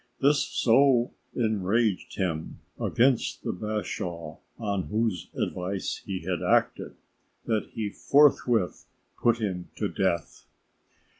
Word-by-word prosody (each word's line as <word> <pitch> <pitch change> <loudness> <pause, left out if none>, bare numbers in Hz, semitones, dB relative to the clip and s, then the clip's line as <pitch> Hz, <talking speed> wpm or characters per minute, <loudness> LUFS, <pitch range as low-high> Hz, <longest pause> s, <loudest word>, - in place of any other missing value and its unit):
This 140 0 +4
so 125 0 +3 0.2
enraged 110 -2 0
him 80 -5 -2 0.2
against 125 0 +2
the - - -2
bashaw 90 -5 -4 0.2
on 100 -5 -2
whose 110 -5 -1
advice 95 +2 -2
he 95 -2 -4
had 90 0 -2
acted, - - +1 0.5
that 110 -2 0
he 105 -2 -3
forthwith 125 -9 +3 0.3
put 120 -1 +4
him 95 -6 -3
to - - -1
death. 85 -4 -1
105 Hz, 105 wpm, -27 LUFS, 90-120 Hz, 0.5 s, This